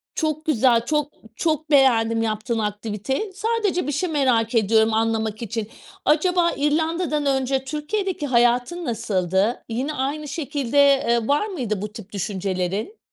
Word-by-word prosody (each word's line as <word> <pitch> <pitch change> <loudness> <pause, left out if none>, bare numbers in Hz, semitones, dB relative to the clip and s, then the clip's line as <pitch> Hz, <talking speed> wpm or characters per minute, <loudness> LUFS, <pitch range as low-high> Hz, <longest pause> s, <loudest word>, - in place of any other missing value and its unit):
Çok 310 -1 -2
güzel, 240 -5 +3
çok 300 +1 0 0.2
çok 310 0 -1
beğendim, 230 -5 +4
yaptığın 225 +1 -1
aktiviteyi. 215 - -3
Sadece 415 - -1
bir - - 0
şey 320 +6 -1
merak 250 -6 +1
ediyorum, 220 0 +3
anlamak 220 -1 0
için. 225 -1 -3 0.4
Acaba 340 +3 +3
İrlanda'dan 305 +1 0
önce 265 -1 +1
Türkiye'deki 305 +3 -3
hayatın 245 +7 +2
nasıldı? 195 - 0
Yine 260 +7 -2
aynı 290 +2 -3
şekilde, 285 -3 -3
eee, 265 -5 +4
var 290 +8 +2
mıydı 235 - -3
bu 210 0 -5
tip 215 -3 -10
düşüncelerin? 195 - -3
265 Hz, 135 wpm, -22 LUFS, 225-305 Hz, 0.4 s, beğendim